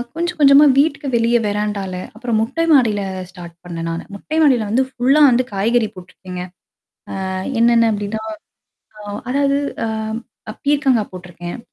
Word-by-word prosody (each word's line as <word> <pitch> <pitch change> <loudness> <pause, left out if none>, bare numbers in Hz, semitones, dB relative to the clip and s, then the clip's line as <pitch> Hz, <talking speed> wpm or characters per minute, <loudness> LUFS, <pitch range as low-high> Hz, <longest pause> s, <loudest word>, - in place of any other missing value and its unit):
கொஞ்சம் 345 +1 -2
கொஞ்சமா 280 +1 +7
வீட்டுக்கு 280 -1 +1
வெளிய 235 +1 +3
வெறாண்டால 205 -2 -2 0.2
அப்புறம் 230 0 -1
மொட்டை 280 +9 -1
மாடியில 220 -7 +3 0.3
ஸ்டார்ட் 175 -2 -11
பண்ணேன் 165 -1 -5
நான். 165 +2 -4
மொட்டை 305 +10 -5
மாடியில 250 -7 +3
வந்து 260 +4 +2
ஃபுல்லா 265 +4 +3
வந்து 250 +1 +2
காய்கறி 220 +3 +1
போட்டுருக்கேங்க. 180 0 -9 0.8
ஆ - - -3 0.3
என்னென்ன 230 -1 +4
அப்டின்னா 205 +1 -4 0.8
ஆ - - -10 0.3
அதாவது 280 +1 +2 0.3
அ - - -2 0.6
அ - - -5
பீர்கங்கா 280 -5 +2
போட்டுருக்கேன். 175 +1 -8
230 Hz, 140 wpm, -19 LUFS, 195-275 Hz, 0.8 s, கொஞ்சமா